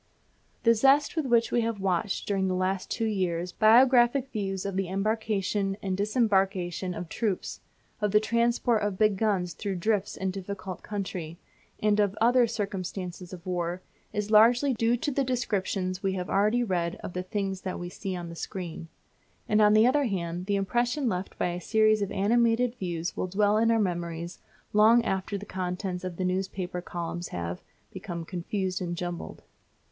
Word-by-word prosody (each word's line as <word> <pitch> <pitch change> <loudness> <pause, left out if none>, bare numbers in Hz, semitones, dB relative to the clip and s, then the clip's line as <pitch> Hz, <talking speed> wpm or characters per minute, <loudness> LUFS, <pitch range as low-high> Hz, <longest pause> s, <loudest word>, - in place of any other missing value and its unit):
The 230 - +6
zest 275 +7 +4
with 315 -4 -1
which 235 -1 +3
we 240 - +2
have 225 -2 -2
watched 190 0 -1
during 195 -2 +1
the 185 - 0
last 185 +1 -1
two 230 - -1
years 180 -4 -1
biographic 245 +4 +5
views 195 -3 -3
of 195 -1 -3
the 195 -1 0
embarkation 200 0 -1
and 190 -1 -1
disembarkation 195 -4 0
of 175 - -5
troops, 200 +2 -2 0.4
of 210 - +2
the 210 +2 +5
transport 235 0 +1
of 205 -2 -1
big 215 -1 +3
guns 190 -4 0
through 195 +4 -4
drifts 205 +2 0
and 190 -1 -2
difficult 190 -1 -6
country, 185 -5 -5 0.5
and 210 0 +3
of 205 -2 +2
the 215 - -2
other 245 0 +5
circumstances 190 -4 -4
of 180 -1 -10
war, 180 0 -2 0.3
is 210 0 -3
largely 240 +5 +5
due 230 +1 +2
to 290 +4 -2
the 275 +1 +1
descriptions 195 -7 -1
we 195 -1 0
have 180 -1 -4
already 215 +5 +3
read 175 -6 -1
of - - -6
the 180 - -2
things 195 0 -3
that 185 -1 -4
we 175 - -5
see 190 +1 -5
on 175 -1 -5
the 170 - -8
screen. 170 -2 -6 0.6
And, 215 0 +3
on 210 0 +6
the 215 +1 +6
other 280 +3 +3
hand, 180 -4 -3
the 205 - +1
impression 240 +7 0
left 185 -1 -4
by - - 0
a 175 +1 -4
series 215 +2 +3
of 200 - -2
animated 230 +4 +2
views 175 -7 -4
will - - -2
dwell 205 +3 +2
in 225 +1 +3
our 230 - +4
memories 170 -3 -3 0.3
long 225 +3 +6
after 190 +1 -1
the 200 - -8
contents 180 -1 -4
of 185 -2 -4
the 185 - -1
newspaper 185 -1 -2
columns 175 0 -5
have 85 0 -5 0.3
become 170 -2 -6
confused 185 +2 -3
and 175 -1 -3
jumbled. 175 -1 -5
195 Hz, 180 wpm, -28 LUFS, 180-220 Hz, 0.6 s, The